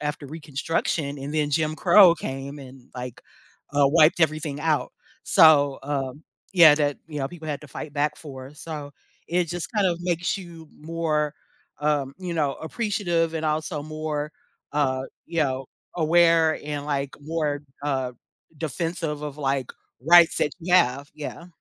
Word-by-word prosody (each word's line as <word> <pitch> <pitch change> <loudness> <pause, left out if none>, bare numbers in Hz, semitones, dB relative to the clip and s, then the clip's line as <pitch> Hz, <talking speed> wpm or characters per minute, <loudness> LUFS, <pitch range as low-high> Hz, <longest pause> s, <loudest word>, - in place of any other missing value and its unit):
after 150 -1 -4
Reconstruction, 150 0 -2
and 140 +2 -6
then 150 -1 +1
Jim 155 +1 0
Crow 180 0 +7
came 135 -1 -6
and, 130 -2 -13
like, 125 -1 -7 0.5
uh, 145 -1 +4
wiped 155 +2 +5
everything 155 -2 0
out. 155 -1 0 0.3
So, 145 -4 +6
um, 135 +1 -4 0.3
yeah, 165 -5 +8
that, 145 -1 0
you 155 -2 -6
know, 135 -1 -2
people 160 -1 -9
had 145 -2 -3
to 150 - -12
fight 145 +2 -7
back 150 +1 0
for, 135 -3 -10
so, 150 -2 -7 0.4
it 175 +1 +2
just 170 +1 -4
kind 205 -2 +3
of 175 -2 0
makes 175 0 0
you 170 -4 -11
more, 155 -2 -1 0.5
um, 145 -2 0
you 180 -2 -4
know, 145 -4 0
appreciative 175 -4 -1
and 160 -1 -1
also 155 0 -1
more, 155 -1 -4 0.4
uh, 135 -3 +1 0.2
you 170 0 -4
know, 135 -2 -2 0.3
aware 165 -1 +4
and, 145 -1 -4
like, 140 -2 -2
more, 150 -1 -2 0.2
uh, 135 -3 -1 0.5
defensive 160 0 -3
of, 150 -1 -6
like, 135 -3 -1 0.3
rights 170 +1 +7
that - - +1
you 175 +2 -3
have, 140 -5 +3
yeah. 155 +3 -7
150 Hz, 155 wpm, -25 LUFS, 145-165 Hz, 0.5 s, yeah